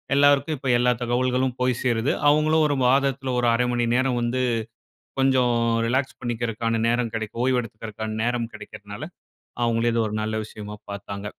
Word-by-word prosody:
எல்லாருக்கும் 145 +2 +4
இப்போ 135 0 -4
எல்லா 125 +1 +3
தகவல்களும் 125 +1 0
போய் 125 -1 +1
சேருது. 120 0 +1 0.2
அவங்களும் 155 +1 +3
1 145 - 0
மாதத்துல, 135 0 +1
ஒரு 120 - +2
00:30 120 0 +1
நேரம் 130 -1 +1
வந்து 120 +2 0 0.8
கொஞ்சம் 130 -2 +3 0.3
ரிலாக்ஸ் 130 +3 -1
பண்ணிக்கிறக்கான 115 -1 -2
நேரம் 120 -1 0
கெடைக்கும், 110 +1 -3
ஓய்வு 130 -1 +2
எடுத்துக்கிறக்கான 110 -1 -6
நேரம் 120 0 -1
கிடைக்கிறனால, 100 +5 -10 0.6
அவுங்களே 115 0 +1
இது 115 - +1
ஒரு 105 - -4
நல்ல 110 0 -2
விஷயமா 105 -1 -8 0.2
பாத்தாங்க. 100 0 -6
120 Hz, 145 wpm, -24 LUFS, 115-130 Hz, 0.8 s, எல்லாருக்கும்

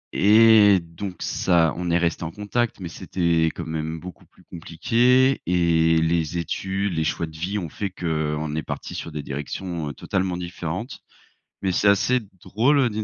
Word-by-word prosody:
Et 105 -1 +6
donc 85 +3 -8
ça 85 -3 +2
on 90 0 -3
est 85 - +3
resté 85 -1 -1
en 80 - -3
contact, 105 +5 -2
mais 90 - -5
c'était 85 -1 0
quand 85 - -5
même 80 0 -4
beaucoup 90 +1 -11
plus - - -24
compliqué, 120 +11 +2
et 85 -2 +3
les 80 0 0
études, 95 +4 -2
les 80 -1 0
choix 80 +2 -1
de 80 -1 -12
vie 90 +6 -3
ont 90 -5 -3
fait 100 +6 -4
qu'on 75 -4 -2
est 80 - -1
parti - - -6
sur 85 - -6
des 75 -1 -5
directions, 75 +3 -5
heu, - - -6
totalement 90 +5 -2
différentes. 90 - -5 0.6
Mais 95 -2 0
c'est 100 - +3
assez 120 +6 +3 0.2
drôle, 120 +10 +2
heu, 130 -3 +3
d'une 110 0 -3
85 Hz, 180 wpm, -23 LUFS, 80-100 Hz, 0.6 s, Et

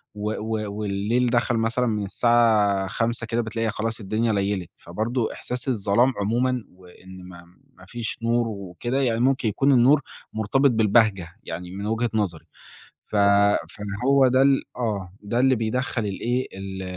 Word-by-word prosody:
و 105 +1 -3
و 110 -1 -3
والليل 105 +5 0
دخَل 120 0 +1
مثلًا 115 +3 0
من 105 -2 -1
الساعة 105 -3 +2
17:00 115 +3 -2
كده، 115 +1 0
بتلاقي 115 0 -2
خلاص 110 +1 -3
الدنيا 110 +2 -1
ليّلِت، 100 -3 -1
فبرضه 110 +7 -3
إحساس 125 +2 -6
الظلام 120 +2 +2
عمومًا 120 +4 0
وإن 95 0 -15
ما 85 -1 -12 0.3
ما 95 - -17
فيش 120 +1 -5
نُور 120 0 +1
وكده، 110 +6 -3
يعني 115 -3 +1
ممكن 130 -2 +2
يكون 135 +7 +2
النُّور 135 +3 +5 0.3
مرتبِط 130 +6 +2
بالبهجة 110 -4 +3 0.2
يعني 90 +3 -7
من 100 +2 -6
وِجهة 115 +2 0
نظري، 85 -7 -2 0.6
ف - - -4
فاللي 100 0 +2
هو 135 -1 +5
ده 130 +1 +3
ال 135 -1 +4
آه، 100 -7 -3
ده 115 +4 -1
اللي 130 0 +4
بيدخّل 115 0 -2
الإيه، 120 +6 -2
ال 95 0 -7
110 Hz, 155 wpm, -24 LUFS, 100-120 Hz, 0.6 s, النُّور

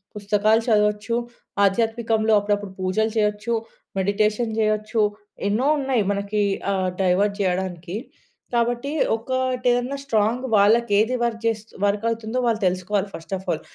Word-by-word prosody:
పుస్తకాలు 210 +2 +2
చదవచ్చు. 210 +1 +2 0.5
ఆధ్యాత్మికంలో 225 +1 +2
అప్పుడప్పుడు 205 -1 -2
పూజలు 190 +4 0
చేయొచ్చు, 210 +2 0 0.4
మెడిటేషన్ 210 +4 +1
జేయొచ్చు 215 +1 +1 0.5
ఎన్నో 215 +6 +1
ఉన్నాయి 265 -6 +1
మనకి 200 +1 -1 0.3
ఆహ్, 185 -1 0
డైవర్ట్ 195 +3 +2
జేయడానికి. 180 -2 -2 0.6
కాబట్టి 240 +3 0 0.2
ఒకటేదన్నా 250 +1 0
స్ట్రాంగ్ 225 0 +1
వాళ్ళకేది 215 +2 +4
వర్క్ 230 -1 -1
జేస్తు 225 -1 -2
వర్క్ 205 +2 +1
అవుతుందో 230 +1 -3
వాళ్ళు 230 -2 +1
తెలుసుకోవాలి 185 +2 0
ఫస్ట్ 165 +3 -8
ఆఫ్ 190 - -12
ఆల్. 155 - -2
215 Hz, 120 wpm, -23 LUFS, 200-230 Hz, 0.6 s, వాళ్ళకేది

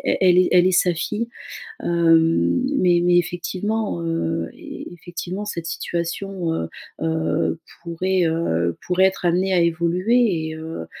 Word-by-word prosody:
è - - +1
elle 180 -1 +5
est - - 0
elle 180 0 +6
est - - +1
sa 180 -1 +1
fille. 210 +7 -3 0.5
Hem, 165 +5 +3 0.2
mais 175 -1 +4
mais 175 0 +5
effectivement, 185 +4 -2
heu, 165 0 -2
e 85 - -2 0.4
effectivement 175 +3 -6
cette 170 -5 -4
situation, 170 +2 -3
heu, 80 - -3 0.3
heu, 160 0 0 0.2
pourrait, 180 +2 0
heu, 85 - 0
pourrait 180 +1 +3
être 190 - -2
amenée 185 +3 +2
à 180 - +4
évoluer 170 +3 +1
et, 160 - -5
heu, 160 - -6
175 Hz, 145 wpm, -22 LUFS, 165-185 Hz, 0.5 s, elle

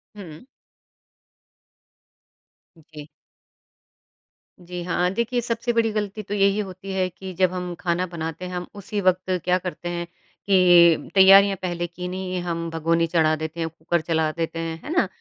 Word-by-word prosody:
हुँ। 175 -1 -11 2.4
जी। 150 -1 -12 1.6
जी 180 0 -6
हाँ, 180 0 0
देखिए, 235 +3 -1
सबसे 235 0 -2
बड़ी 230 -1 +2
गलती 210 0 -3
तो 205 - -6
यही 200 0 +2
होती 195 -1 -6
है 185 -1 +1
कि 185 +1 -9
जब 185 -1 +4
हम 180 -1 -4
खाना 175 +1 0
बनाते 165 +1 -5
हैं 180 - -7
हम 180 0 -4
उसी 205 +1 -4
वक़्त 185 0 +1 0.2
क्या 180 0 +3
करते 180 -1 -6
हैं, 175 0 -3 0.4
कि 175 -4 +5
तैयारियाँ 195 +1 +7
पहले 175 -1 -3
की 180 +1 -7
नहीं 185 0 -5
है, 180 - -2
हम 170 -1 -3
भगोनी 165 +1 +1
चढ़ा 160 -2 +2
देते 160 +1 -6
हैं, 165 - -1
कुकर 165 +1 -2
चला 160 -1 0
देते 165 0 -4
हैं। 165 0 -4
है - - -8
ना? 360 - +2
180 Hz, 160 wpm, -23 LUFS, 165-195 Hz, 2.4 s, तैयारियाँ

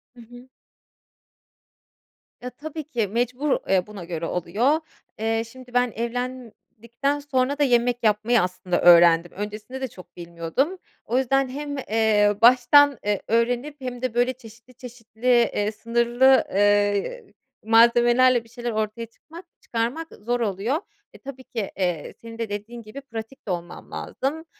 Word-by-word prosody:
Hı 240 - -13
hı. 245 +2 -15 1.9
Ya, 250 - -5
tabii 310 +4 -8
ki 240 -8 -2
mecbur, 250 +6 -1
eee, 190 0 +2
buna 205 -4 -9
göre 165 -1 -4
oluyor. 220 - 0 0.4
Eee, 225 +1 0
şimdi 255 -1 -14
ben 245 -1 +2
evlendikten 245 +2 -4
sonra 285 0 -1
da - - +4
yemek 245 -2 +2
yapmayı, 220 +2 +3
aslında, 180 0 -2
öğrendim. 170 -1 +6
Öncesinde 210 +6 -7
de 265 - -2
çok 185 -5 -15
bilmiyordum. 170 - -2 0.3
O 240 +3 0
yüzden 265 0 +1
hem, 285 +1 -5
eee, 215 -4 +2
baştan, 255 +3 +6
eee, 205 -2 0
öğrenip 245 +6 0
hem 250 -1 -6
de, 255 -3 -2
böyle, 245 +2 +1
çeşitli, 235 +1 -16
çeşitli, 240 -1 -9
eee, 235 -3 +2
sınırlı, 235 +4 +3
eee, 205 - +1 0.4
malzemelerle 240 +2 +5
bir 230 - -21
şeyler 240 0 -5
ortaya 215 +1 -3
çıkmak 325 +10 -14 0.2
çıkarmak, 245 +8 -3
ııı, 205 - -16
zor 245 +2 -1
oluyor. 220 +4 -1 0.4
E, - - -13
tabii 265 -1 -10
ki, 220 -6 -5
eee, 175 -5 -2
senin 230 0 -10
de 230 -2 -4
dediğin 220 +4 -6
gibi 220 +6 -10
pratik 230 -2 -9
de - - -1
olmam 175 0 -6
lazım, 310 +5 -4
235 Hz, 145 wpm, -24 LUFS, 210-255 Hz, 1.9 s, öğrendim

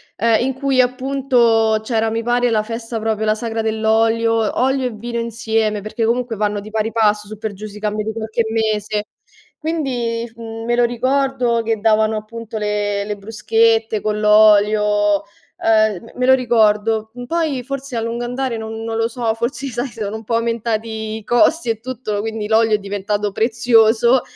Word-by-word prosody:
ehm, 225 +1 +2
in 265 - -1
cui, 265 0 0
appunto, 250 -4 +2
c'era 225 -1 0
mi 225 +1 -1
pare 240 +1 +1
la 215 -1 +2
festa 230 +1 -5
proprio, 220 0 -1
la 215 - +3
sagra 225 0 -3
dell'olio, 225 0 +1
olio 265 0 +1
e 250 - -1
vino 235 +2 -6
insieme, 220 -2 -1
perché 215 +3 -2
comunque 235 0 0
vanno 210 0 -1
di 205 +1 -9
pari 220 0 -1
passo 210 -2 +2
su 215 0 -9
per 215 -1 -4
giù 205 +2 -9
si 210 0 -9
cambia 210 0 -2
di 220 - -2
qualche 220 +1 -2
mese, 215 -1 -1 0.5
quindi, 245 -8 -2
mhmm, 225 0 -7
me 240 +1 +1
lo 245 - +3
ricordo 250 0 +1
che 225 -1 -1
davano, 220 0 +2
appunto, 225 +1 -7
le 205 -1 -1
le 210 0 -4
bruschette 225 +1 +1
con 210 0 -1
l'olio, 210 -1 +4 0.4
ehm, 220 -1 +2
me 250 - 0
lo 260 - +6
ricordo. 220 -3 +2
Poi 310 -4 -1
forse 275 0 -6
a 230 - -1
lungo 230 +1 -3
andare 250 -1 -2
non 220 0 -6
non 225 0 -3
lo 225 0 +1
so, 230 -1 -1
forse, 240 +4 -3
sai, 245 +1 -3
sono 220 -3 -5
un 220 - -11
po' 230 - -1
aumentati 225 -1 -2
i 220 - -10
costi 240 +6 +2
e 225 -1 -1
tutto, 235 -3 -4
quindi 220 0 -3
l'olio 220 0 +4
è - - +1
diventato 205 +1 -2
prezioso 235 +2 +3
225 Hz, 175 wpm, -19 LUFS, 215-240 Hz, 0.5 s, lo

